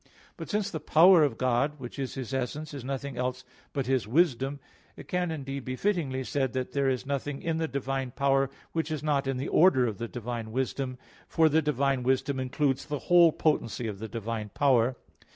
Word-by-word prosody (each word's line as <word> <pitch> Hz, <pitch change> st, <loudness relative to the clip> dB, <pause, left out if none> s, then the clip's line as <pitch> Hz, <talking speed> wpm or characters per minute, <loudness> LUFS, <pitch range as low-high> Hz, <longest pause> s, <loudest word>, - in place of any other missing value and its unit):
But -, -, -8 dB
since 205 Hz, -2 st, -1 dB
the 160 Hz, -, -3 dB
power 165 Hz, +3 st, +6 dB
of 135 Hz, -6 st, 0 dB
God, 130 Hz, +4 st, +1 dB
which 125 Hz, +2 st, -8 dB
is 135 Hz, -2 st, -3 dB
His 130 Hz, -1 st, -5 dB
essence, 145 Hz, +4 st, -3 dB
is 140 Hz, -4 st, -6 dB
nothing 135 Hz, 0 st, -4 dB
else 125 Hz, +1 st, -2 dB, 0.3 s
but 135 Hz, -3 st, -2 dB
His 130 Hz, -4 st, 0 dB
wisdom, 140 Hz, 0 st, +1 dB, 0.4 s
it -, -, -11 dB
can 180 Hz, -1 st, -1 dB
indeed 140 Hz, -4 st, -5 dB
be 130 Hz, 0 st, -4 dB
fittingly 145 Hz, -7 st, -1 dB
said 135 Hz, -2 st, -1 dB
that 130 Hz, -1 st, -3 dB
there 140 Hz, -1 st, +1 dB
is 130 Hz, -1 st, -2 dB
nothing 140 Hz, 0 st, -3 dB
in 165 Hz, -1 st, -2 dB
the 160 Hz, 0 st, -1 dB
divine 135 Hz, -1 st, -2 dB
power 135 Hz, +1 st, +1 dB, 0.2 s
which 160 Hz, -1 st, -2 dB
is 155 Hz, -2 st, -3 dB
not 145 Hz, -3 st, +1 dB
in 135 Hz, -1 st, -1 dB
the 135 Hz, -, -3 dB
order 150 Hz, -8 st, +5 dB
of 110 Hz, -3 st, -3 dB
the 115 Hz, -, -3 dB
divine 115 Hz, -1 st, -5 dB
wisdom; 130 Hz, +1 st, -2 dB, 0.3 s
for 160 Hz, -1 st, +3 dB
the 160 Hz, +2 st, +3 dB
divine 140 Hz, -3 st, +1 dB
wisdom 130 Hz, +2 st, 0 dB
includes 135 Hz, +1 st, 0 dB
the 150 Hz, -1 st, -2 dB, 0.2 s
whole 170 Hz, -2 st, +8 dB
potency 125 Hz, -8 st, 0 dB
of 105 Hz, -3 st, -4 dB
the 110 Hz, -, -5 dB
divine 115 Hz, -2 st, -4 dB
power. 130 Hz, -3 st, +3 dB
135 Hz, 205 wpm, -28 LUFS, 125-150 Hz, 0.4 s, whole